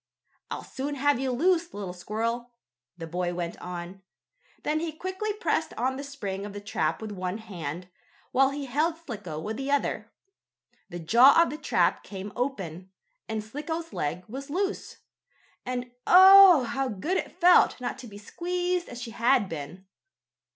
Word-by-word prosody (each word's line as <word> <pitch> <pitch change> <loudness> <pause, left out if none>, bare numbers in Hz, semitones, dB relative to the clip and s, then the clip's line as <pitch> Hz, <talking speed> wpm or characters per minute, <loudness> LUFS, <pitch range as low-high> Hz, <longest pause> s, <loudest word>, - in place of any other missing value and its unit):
"I'll - - -5
soon 280 +2 -5
have 285 -1 +2
you 265 0 -1
loose, 340 +6 +1
little 195 -3 -5
squirrel," 230 +6 -3 0.5
the 165 - -6
boy 175 +1 -2
went 175 -1 -3
on. 180 +1 -7 0.6
Then 305 +1 0
he 330 0 -3
quickly 375 +6 -4
pressed 425 +3 -1
on 260 +1 -1
the 275 - -6
spring 205 -9 -5
of 205 -1 -7
the 205 - -6
trap 205 +2 -2
with 215 - -5
one 185 0 -3
hand, 175 -5 -7 0.4
while 270 +1 +4
he 280 0 -5
held 310 +6 0
Slicko 210 - -7
with 215 +7 -4
the 270 +1 -4
other. 285 0 -1 0.8
The 175 - -6
jaws 240 - +6
of - - -2
the 300 - -5
trap 305 - +1
came 200 0 -8
open, 190 - -4 0.4
and 220 -1 -2
Slicko's 320 +8 -5
leg 165 +5 -3
was 275 +5 -7
loose. 385 +6 -3 0.7
And 250 -1 -3 0.2
oh! 375 -4 +9
how 270 +3 -2
good 280 - -2
it - - -5
felt 355 -5 +5
not 250 +1 -4
to 255 - -9
be 205 -2 -11
squeezed 355 - -2
as 240 - -8
she 235 -1 -6
had 235 -1 +2
been. 165 +3 -7
245 Hz, 165 wpm, -27 LUFS, 195-300 Hz, 0.8 s, oh